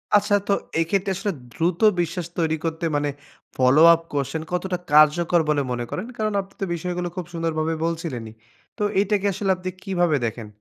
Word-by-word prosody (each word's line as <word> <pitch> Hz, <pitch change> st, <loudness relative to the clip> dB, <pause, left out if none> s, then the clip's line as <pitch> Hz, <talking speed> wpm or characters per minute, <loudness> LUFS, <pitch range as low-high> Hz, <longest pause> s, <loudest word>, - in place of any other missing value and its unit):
আচ্ছা 205 Hz, 0 st, +4 dB
তো 200 Hz, -, +3 dB, 0.3 s
এইক্ষেত্রে 195 Hz, +4 st, 0 dB
আসলে 205 Hz, +2 st, -2 dB, 0.2 s
দ্রুত 170 Hz, +1 st, 0 dB, 0.2 s
বিশ্বাস 170 Hz, +1 st, -3 dB
তৈরী 160 Hz, -1 st, +1 dB
করতে 165 Hz, +1 st, -2 dB
মানে 145 Hz, 0 st, 0 dB, 0.5 s
ফলোআপ 155 Hz, +6 st, +6 dB
কোয়েশ্চেন 145 Hz, +2 st, -2 dB
কতটা 180 Hz, +1 st, -1 dB
কার্যকর 155 Hz, +3 st, +5 dB
বলে 145 Hz, -1 st, +2 dB
মনে 120 Hz, -1 st, -2 dB
করেন? -, -, -4 dB
কারন 215 Hz, -1 st, -1 dB
আপনি 195 Hz, 0 st, -16 dB
তো -, -, +1 dB
বিষয়গুলো 180 Hz, +1 st, -3 dB
খুব 180 Hz, -2 st, -4 dB
সুন্দর 165 Hz, -1 st, -1 dB
ভাবে 160 Hz, +1 st, 0 dB
বলছিলেনই। 150 Hz, -10 st, -4 dB, 0.4 s
তো -, -, -1 dB, 0.2 s
এইটাকে 205 Hz, 0 st, +1 dB
আসলে 195 Hz, +1 st, 0 dB
আপনি 185 Hz, 0 st, -5 dB
কীভাবে 175 Hz, -5 st, +1 dB
দেখেন? 115 Hz, -1 st, -4 dB
170 Hz, 170 wpm, -23 LUFS, 155-190 Hz, 0.5 s, ফলোআপ